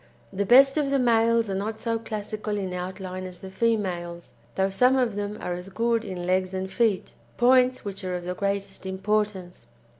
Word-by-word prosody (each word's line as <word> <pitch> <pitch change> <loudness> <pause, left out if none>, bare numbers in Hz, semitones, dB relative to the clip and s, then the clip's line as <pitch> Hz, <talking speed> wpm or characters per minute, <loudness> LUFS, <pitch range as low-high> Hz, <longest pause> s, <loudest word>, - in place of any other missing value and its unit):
The 200 +1 -1
best 270 +5 +7
of 285 -2 0
the 275 - +2
males 230 -2 +3
are 195 - -2
not 215 +3 -3
so 230 -1 -1
classical 215 -1 -4
in 190 -2 -3
outline 185 +1 -5
as 185 -1 -8
the 190 +1 -10
females, 185 - -2 0.2
though 190 0 +1
some 250 +7 +4
of 250 -4 +1
them 205 +1 -4
are 180 - -3
as 180 +2 -6
good 230 +3 0
in 180 -2 -5
legs 185 +1 0
and 190 0 -4
feet 220 -6 0 0.2
points 255 0 +4
which 200 -1 -5
are 185 -1 -2
of 175 - -5
the 180 - -2
greatest 200 0 -3
importance. 190 - -2
200 Hz, 190 wpm, -26 LUFS, 185-230 Hz, 0.2 s, best